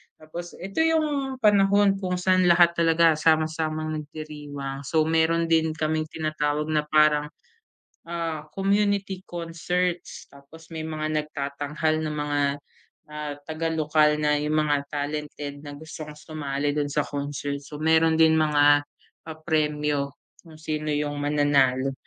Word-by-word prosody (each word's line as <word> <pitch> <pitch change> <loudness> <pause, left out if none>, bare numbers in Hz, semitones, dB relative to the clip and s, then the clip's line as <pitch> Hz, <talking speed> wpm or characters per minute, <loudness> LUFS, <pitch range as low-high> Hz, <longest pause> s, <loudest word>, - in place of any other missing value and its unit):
Tapos 170 +3 -9
ito 195 - -6
yung 305 -4 +1
panahon 200 -1 +4
kung 185 -2 -2
saan 185 0 +2
lahat 170 0 +6
talaga 165 0 +5
sama-samang 155 0 0
nagdiriwang. 145 -2 -7
So, 160 -2 +2
meron 165 +1 +1
din 160 -1 +2
kaming 155 0 -1
tinatawag 155 -1 -2
na 150 -1 0
parang, 150 -1 +4 0.8
ah, 165 -2 -4
community 195 -1 0
concerts. 175 +1 -3
Tapos 150 +4 -16
may 160 -1 -5
mga 155 -1 -3
nagtatanghal 150 +1 -2
na 155 - -2
mga, 145 -1 -1 0.7
ah, 150 -1 -5 0.2
taga 160 +1 -2
lokal 150 -1 +2
na 150 0 +2
yung 150 +1 +1
mga 145 -2 +1
talented 145 0 -5
na 145 - -7
gustong 155 +1 -9
sumali 145 -1 -3
dun 145 -1 -1
sa 150 - +1
concert. 145 0 -3
So, 150 +1 -9
meron 160 0 +3
din 160 0 +6
mga 145 -2 +4 0.4
papremyo 150 -3 -1 0.3
kung 160 -2 -15
sino 155 -1 -3
yung 145 0 -2
mananalo. 140 -3 +2
155 Hz, 130 wpm, -25 LUFS, 150-165 Hz, 0.8 s, lahat